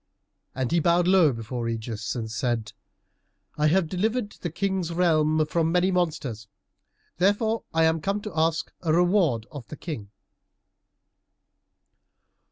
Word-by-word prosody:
And 130 -2 -2
he 170 - +3
bowed 170 +2 +3
low 180 -5 +5
before 115 0 -4
Ægeus 115 -1 -4
and 110 -2 -4
said, 115 -1 -2 0.8
"I 150 0 +2
have 175 +2 +3
delivered 210 +5 -1
the 175 - -6
King's 185 0 -2
realm 155 -3 +2
from 160 +1 0
many 180 +2 +2
monsters, 150 - -2 0.7
therefore 205 +5 +1
I 165 0 +2
am 160 0 +2
come 200 +5 -1
to 210 -3 -7
ask 160 0 0
a 165 - 0
reward 175 - +3
of 140 -6 -9
the 155 - -9
King." 130 - -6
160 Hz, 135 wpm, -26 LUFS, 125-180 Hz, 0.8 s, low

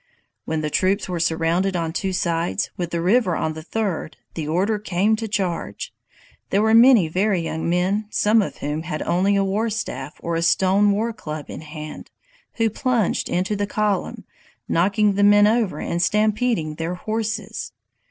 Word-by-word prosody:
"When 160 -1 -2
the 150 -1 -3
troops 190 +5 +1
were 180 -2 -3
surrounded 170 +3 +1
on 165 -2 -2
two 190 +1 -2
sides, 170 -2 -1
with 175 -2 -3
the 170 -1 -2
river 190 -1 +3
on 155 - -1
the 160 - -8
third, 185 -2 -3 0.2
the 155 -3 -4
order 195 +7 0
came 205 +2 +1
to 225 0 -4
charge! 190 -5 -3 0.6
There 200 +2 +2
were 220 0 +3
many 230 -5 +7
very 185 +3 +1
young 160 0 -3
men, 190 +5 0
some 215 +1 +3
of 195 - -4
whom 150 +2 -3
had 160 -2 -4
only 195 +3 +2
a 200 - +2
war 205 +4 0
staff 150 - -4
or 170 - -3
a 165 - 0
stone 190 +4 +3
war 225 +3 -1
club 155 -7 -7
in - - -7
hand, 155 0 -9 0.4
who 225 -1 +1
plunged 240 -4 0
into 185 +4 0
the 205 0 -1
column, 210 -2 -1 0.4
knocking 200 +4 +2
the 205 +1 +1
men 205 0 +6
over 220 -2 +1
and 170 - -2
stampeding 210 -6 +1
their 165 +2 -3
horses. 220 +1 -4
190 Hz, 175 wpm, -22 LUFS, 165-210 Hz, 0.6 s, many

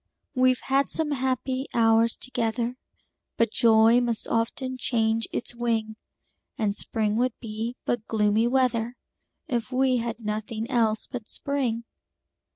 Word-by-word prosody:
We've 255 -1 +3
had 275 +1 +1
some 315 -2 +1
happy 260 0 -1
hours 225 0 +4
together, 240 -1 -2 0.6
But 230 -2 +2
joy 225 +1 +5
must 235 -2 0
often 255 +3 -1
change 225 -2 +1
its 240 - -3
wing; 225 -2 -1 0.6
And 205 -2 0
spring 215 -1 0
would 250 0 +1
be 225 +2 -4
but 240 -2 -2
gloomy 215 +1 +2
weather, 245 -2 +1 0.5
If 240 -3 -2
we 255 0 +2
had 230 -1 -3
nothing 215 +1 -4
else 225 -3 +2
but 240 -4 -7
spring. 260 -5 -1
235 Hz, 130 wpm, -26 LUFS, 225-255 Hz, 0.6 s, joy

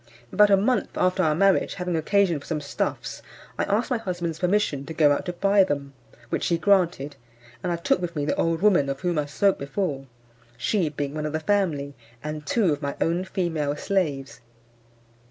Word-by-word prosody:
About 210 0 +6
a 195 - +6
month 235 +6 +1
after 185 +1 +2
our 155 -4 +2
marriage, 195 +3 +3
having 180 -1 -2
occasion 175 0 +2
for - - -14
some 160 -2 -1
stuffs, 140 -1 -3 0.4
I - - +2
asked 220 +6 0
my 245 - +1
husband's 175 -5 -4
permission 180 -7 +1
to 160 - -6
go 150 -2 +5
out 145 - -1
to 180 - -2
buy 195 +2 +4
them, 140 -5 -3 0.4
which - - -1
he 170 - +2
granted; 170 -5 +1 0.4
and 180 - -2
I - - +1
took 170 +2 0
with 170 -1 -4
me 145 -1 -1
the - - +1
old 165 +2 0
woman 175 -10 +4
of 135 -1 -4
whom 175 -3 0
I 145 - -2
spoke 195 +6 +1
before, 140 -1 -3 0.5
she 170 - 0
being 145 -1 -4
one 155 0 -3
of 150 - -5
the 155 - 0
family, 155 -6 0 0.3
and 150 0 -5
two 200 -9 +2
of 145 - -5
my 140 -1 -3
own 175 +3 0
female 160 -6 -1
slaves. 145 -8 -2
165 Hz, 200 wpm, -25 LUFS, 145-190 Hz, 0.5 s, About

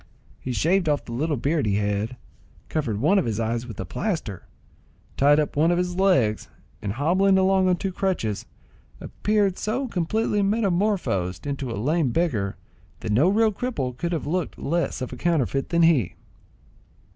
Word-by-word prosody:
He 130 - -5
shaved 170 +6 +2
off 145 -1 0
the - - -9
little 145 +5 -1
beard 145 +1 0
he 100 - +1
had, 105 +4 -1 0.5
covered 120 -10 -1
one 185 - +4
of - - -1
his 115 -1 -2
eyes 115 +2 -2
with 115 - -9
a 95 - -3
plaster, 155 - -4 0.7
tied 145 +2 +4
up 150 - -1
one 155 +3 +3
of 175 - +2
his 180 0 -1
legs, 175 - +2 0.3
and 100 -1 -3
hobbling 185 - +3
along 190 0 +3
on 180 - +3
two 195 +2 -3
crutches, 180 - -2 0.5
appeared 205 -3 0
so 250 +6 -1
completely 210 +2 0
metamorphosed 195 - 0
into 140 -2 -3
a 115 - -4
lame 150 +6 +1
beggar, 115 - -1 0.4
that 110 - -3
no 135 - +4
real 220 +2 +3
cripple 195 - -3
could 170 +6 -3
have 165 -5 -2
looked 170 +1 -2
less 170 -2 -1
of 130 - -6
a - - -7
counterfeit 140 -5 0
than 170 -1 +3
he. 145 - +3
160 Hz, 170 wpm, -24 LUFS, 120-190 Hz, 0.7 s, one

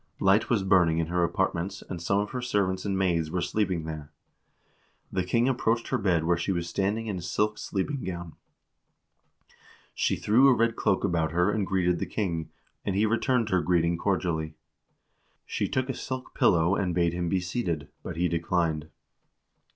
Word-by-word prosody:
Light 95 +3 +3
was 110 -5 +2
burning 90 -4 +4
in 80 -1 -1
her 90 0 +1
apartments, 90 +2 -1
and 90 -3 -6
some 100 +3 +1
of 105 +1 -1
her 125 - -3
servants 100 -6 0
and 100 -1 0
maids 85 -4 +1
were 90 +3 -1
sleep 95 +3 0
ing 85 -3 -2
there. 80 -2 -7 1.0
The 95 - 0
king 115 +7 +2
approached 115 -3 0
her - - 0
bed 90 -6 +2
where 85 +1 +2
she 85 +3 -1
was 85 -2 -2
standing 100 +5 -1
in 100 -4 -3
a - - -7
silk 105 +5 -1
sleeping 125 +8 -3
gown. 85 -3 -5 1.6
She - - +1
threw 120 +6 +4
a 135 - +6
red 115 0 +2
cloak 95 - +1
about 85 -5 0
her 90 +4 +3
and 105 -3 -1
greeted 90 -2 +1
the - - -2
king, 85 -7 -2 0.3
and 95 - -2
he 105 +3 +3
returned 115 +1 +1
her 90 -2 +2
greeting 85 0 +2
cordially. 85 -4 -1 0.9
She - - -2
took 130 -1 -1
a 135 - -2
silk 130 0 -6
pillow 85 -7 +3
and 90 -4 -1
bade 85 -1 +2
him 85 -1 -2
be 95 - +1
seated, 90 -5 -2
but - - -6
he 90 +1 +2
declined. 85 -2 -1
90 Hz, 185 wpm, -27 LUFS, 85-105 Hz, 1.6 s, a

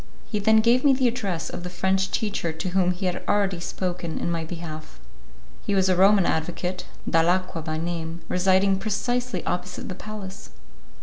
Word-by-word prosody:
He 210 - 0
then 220 +1 +5
gave 235 +3 +4
me 280 -2 +6
the 260 -1 +3
address 195 -9 -2
of - - -6
the 180 - -5
French 190 +2 +1
teacher 200 -6 -1
to 160 +3 -4
whom 180 0 +2
he 180 +2 -2
had 180 -1 -1
already 195 -3 +1
spoken 175 -1 -3
in 170 - -1
my 165 -1 -1
behalf. 160 - -7 0.6
He 205 - 0
was 190 -1 +3
a 185 - +4
Roman 195 +1 +5
advocate, 175 +3 -2 0.2
Dalacqua 175 +1 +2
by 155 -1 -3
name, 165 0 -4
residing 190 +1 +3
precisely 240 0 -1
opposite 180 0 -3
the - - -3
palace. 205 0 -8
185 Hz, 175 wpm, -25 LUFS, 170-200 Hz, 0.6 s, me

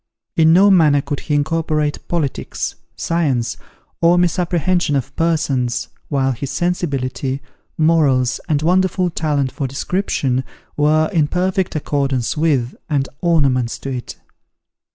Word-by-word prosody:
In 160 -1 +5
no 195 +4 +6
manner 155 -6 +5
could 140 0 -3
he 150 - -2
incorporate 155 0 -1
politics, 160 -6 -2 0.2
science, 145 -9 0 0.5
or 170 +1 +5
misapprehension 175 -2 +1
of 135 0 -3
persons, 150 -7 0 0.2
while 135 -2 +1
his 130 +2 -4
sensibility, 140 -6 -2 0.4
morals, 150 -6 +3
and 150 -1 +1
wonderful 185 +1 +2
talent 145 -5 0
for 140 - -3
description, 135 -3 -1 0.3
were 155 +1 +3
in 155 -4 +3
perfect 185 +2 -1
accordance 135 -5 -1
with, 145 -6 +1
and 140 -3 0
ornaments 135 -8 +2
to 135 - -6
it. 125 - -6
150 Hz, 120 wpm, -19 LUFS, 135-170 Hz, 0.5 s, no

